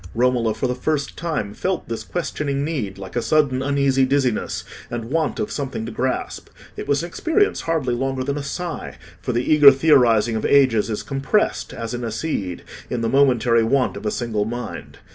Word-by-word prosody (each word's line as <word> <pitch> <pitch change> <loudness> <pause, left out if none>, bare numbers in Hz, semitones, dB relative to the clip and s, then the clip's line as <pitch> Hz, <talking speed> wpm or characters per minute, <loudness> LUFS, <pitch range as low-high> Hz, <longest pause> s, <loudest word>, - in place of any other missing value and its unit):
Romola 120 -1 +2
for 110 - -2
the 125 - 0
first 140 +3 -2
time 155 -12 -3
felt 185 - -2
this 115 -1 -4
questioning 140 -1 -2
need 130 -12 -3
like 95 +2 -9
a 120 - +1
sudden 140 -2 +2
uneasy 140 -1 +2
dizziness 130 -3 0 0.3
and 120 0 -5
want 160 -1 0
of 215 - -2
something 135 -5 -4
to 115 - -5
grasp; 130 +3 -3 0.3
it - - -6
was 140 +3 +1
an - - -3
experience 330 - +1
hardly 155 -7 0
longer 135 +1 -1
than 140 +1 -2
a - - -3
sigh, 170 +5 -5 0.2
for 125 - -2
the 120 +1 0
eager 150 -2 +9
theorising 125 -6 +4
of 110 - -2
ages 130 -6 +4
is 105 - -3
compressed, 135 +10 0
as 115 0 -5
in 120 0 -4
a 115 - -2
seed, 105 - -3 0.3
in 120 - -2
the 115 - 0
momentary 125 -4 +3
want 130 +3 +1
of 110 - -5
a - - +2
single 110 -2 -1
mind. 120 +2 -6
130 Hz, 195 wpm, -22 LUFS, 115-145 Hz, 0.3 s, eager